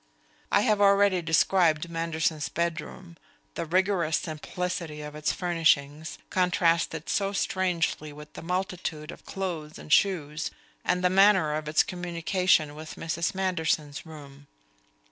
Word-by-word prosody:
I 200 - +4
have 210 -1 +2
already 200 -2 +4
described 165 0 +3
Manderson's 165 -2 -1
bedroom, 170 +1 -4 0.4
the 170 - -4
rigorous 180 -3 +2
simplicity 160 0 -4
of 150 0 -7
its 150 0 -1
furnishings, 160 -3 +1
contrasted 170 -3 +1
so 200 -1 0
strangely 180 -6 -1
with 150 +1 -12
the - - -8
multitude 180 -3 -3
of - - -14
clothes 170 -6 -4
and 150 - -2
shoes, 165 -6 +2 0.3
and 180 0 0
the 180 - +3
manner 190 -5 +5
of 155 0 -3
its 155 - +4
communication 175 -2 +1
with 155 +1 -9
Mrs. 170 +2 -2
Manderson's 160 -6 -1
room. 145 -3 -12
165 Hz, 125 wpm, -27 LUFS, 155-185 Hz, 0.4 s, manner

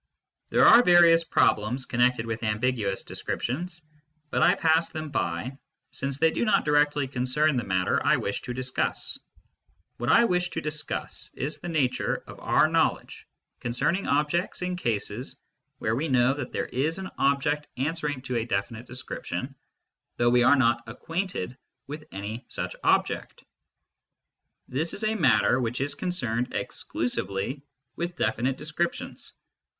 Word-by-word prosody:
There - - +4
are 235 - +9
various 170 -4 +6
problems 125 -3 +1
connected 125 -1 +2
with 115 0 -4
ambiguous 110 -2 -1
descriptions, 175 +7 -4 0.5
but - - +1
I - - +5
pass 160 +1 +2
them 155 -2 -6
by, 85 - -2 0.3
since 140 0 -3
they 160 +2 +3
do - - -1
not 215 - +3
directly 145 -1 +2
concern 135 +4 +1
the 120 - 0
matter 95 -2 +1
I - - +4
wish - - -3
to 125 - -5
discuss. 130 0 -2 0.8
What 120 +2 -2
I 235 - +6
wish 180 -4 +1
tojiiscuss 155 -3 -4
is 145 +3 -3
the 175 - -6
nature 130 -6 0
of - - -11
our - - +3
knowledge - - 0 0.3
concerning 135 +10 0
objects 150 +6 0
in 180 0 -1
cases 115 - -3 0.4
where 110 +1 -1
we 150 +6 -1
know 130 -1 +3
that 140 -3 -5
there - - -2
is 150 +6 -1
an 190 -1 -6
object 145 +2 +1
answering 145 -1 -2
to 125 -2 -2
a 115 - 0
definite 110 +2 -3
description, 130 +1 -5 0.6
with 125 - 0
any 105 +5 -6
such - - -5
object. - - 0 1.2
This 155 +6 -1
is 210 - -4
a 215 0 +1
matter 115 - +3
which 120 0 -2
is 140 +1 0
concerned 125 -10 -2
exclusively 120 +3 -2 0.3
with 175 +1 -3
definite 125 0 0
descriptions. 170 +3 -4
135 Hz, 135 wpm, -27 LUFS, 120-160 Hz, 1.2 s, are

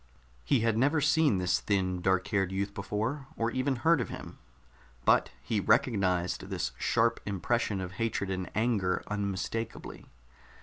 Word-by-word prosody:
He - - +2
had 115 -1 +1
never 145 +5 +3
seen 150 -5 +3
this 90 -1 +1
thin, 95 -3 0
dark 95 0 +1
haired 95 -3 +1
youth 100 +1 -2
before, 110 +8 -3
or 115 +1 0
even 130 +2 0
heard 160 +4 +3
of - - -4
him, - - -8 0.7
but - - +4
he 105 +9 0
recognized 100 - +1
this - - -2
sharp 115 0 +2
impression 105 +1 -1
of 90 -1 -4
hatred 100 -4 -1
and 95 -1 -3
anger 105 -5 +1
unmistakably. 105 +2 -4
105 Hz, 145 wpm, -30 LUFS, 95-120 Hz, 0.7 s, but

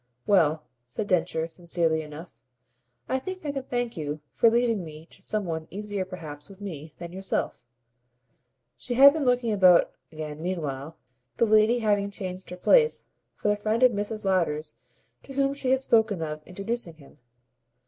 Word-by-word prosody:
"Well," 160 -6 +3 0.2
said 130 - -4
Densher 165 -3 0
sincerely 165 -1 -1
enough, 150 -5 -11 0.7
"I 260 - 0
think 370 +4 -7
I 290 - -1
can 275 -1 -3
thank 245 -2 -2
you 150 -1 -4
for 230 - +5
leaving 230 -4 +1
me 155 -1 -10
to - - -4
some 210 +1 -2
one 160 -2 -4
easier 205 0 -4
perhaps 155 -5 -9
with 195 -1 -14
me 160 -6 -8
than 170 -1 -8
yourself." 190 -8 -2 1.1
She 245 - -4
had 280 +3 +9
been 310 -3 -1
looking 245 -2 +2
about 185 -3 +6 0.2
again 155 -1 -6
meanwhile, 160 -4 -4 0.4
the - - +4
lady 215 +2 +4
having 205 -1 +2
changed 185 -2 -6
her 180 - -7
place, 465 - +4 0.3
for - - -3
the 205 - +4
friend 215 +3 0
of 255 - +7
Mrs. 205 0 -4
Lowder's 160 -5 0 0.5
to 270 - -11
whom 275 0 +1
she 280 -2 -2
had 265 0 +3
spoken 220 -8 +2
of 155 -1 -5
introducing 195 -1 -4
him. 145 -3 -18
190 Hz, 170 wpm, -26 LUFS, 160-230 Hz, 1.1 s, had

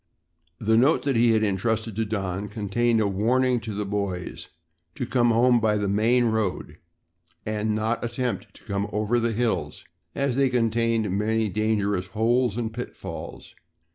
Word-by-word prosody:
The 110 +3 +2
note 135 +7 +4
that 140 -2 0
he 115 +1 +4
had 110 -1 +3
entrusted 110 +2 -1
to 110 - +1
Don 100 -2 -3
contained 110 +3 0
a 105 - +2
warning 120 +6 +2
to 110 -2 -6
the 105 0 -2
boys 100 -3 -4 0.5
to 125 - -3
come 120 -1 +2
home 120 +1 +4
by 110 -2 +2
the 105 -1 -1
main 115 +5 +3
road 110 -4 -2 0.7
and 110 0 -1
not 110 +2 -1
attempt 120 +1 -3
to - - -17
come 100 -1 -2
over 110 +3 +1
the 115 0 0
hills 115 +1 -2 0.3
as 140 -3 0
they 135 -1 +3
contained 115 -3 +1
many 110 +1 0
dangerous 105 -2 0
holes 115 +3 +1
and 115 -2 -3
pitfalls. 125 +1 -7
110 Hz, 160 wpm, -25 LUFS, 105-120 Hz, 0.7 s, note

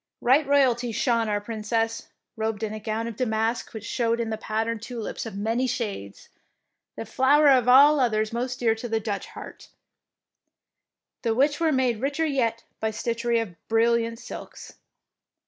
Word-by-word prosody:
Right 270 +4 +3
royally 250 -4 +3
shone 230 0 +1
our 205 0 0
Princess, 225 +1 -2 0.3
robed 220 -1 -3
in 215 -1 -2
a 215 - -5
gown 220 +1 -3
of 230 -1 -5
damask 225 -1 -1
which 220 -2 -8
showed 230 0 0
in 230 -1 -2
the - - 0
pattern 220 +1 -2
tulips 230 0 -6
of 205 -3 -7
many 225 +5 0
shades, 200 - -5 0.7
the - - -6
flower 285 +6 +4
of 255 -3 +4
all 285 +4 +7
others 220 -3 +1
most 245 +1 -2
dear 230 -2 +3
to 225 +2 -7
the 225 0 0
Dutch 205 -2 -4
heart, - - -11 1.5
the 225 -2 0
which 285 +4 +2
were 325 -1 +2
made 255 -5 +1
richer 285 +4 0
yet 235 -6 0 0.2
by 220 - 0
stitchery 235 +2 -1
of 220 -6 -4
brilliant 230 0 +2
silks. - - -10
230 Hz, 165 wpm, -25 LUFS, 220-250 Hz, 1.5 s, all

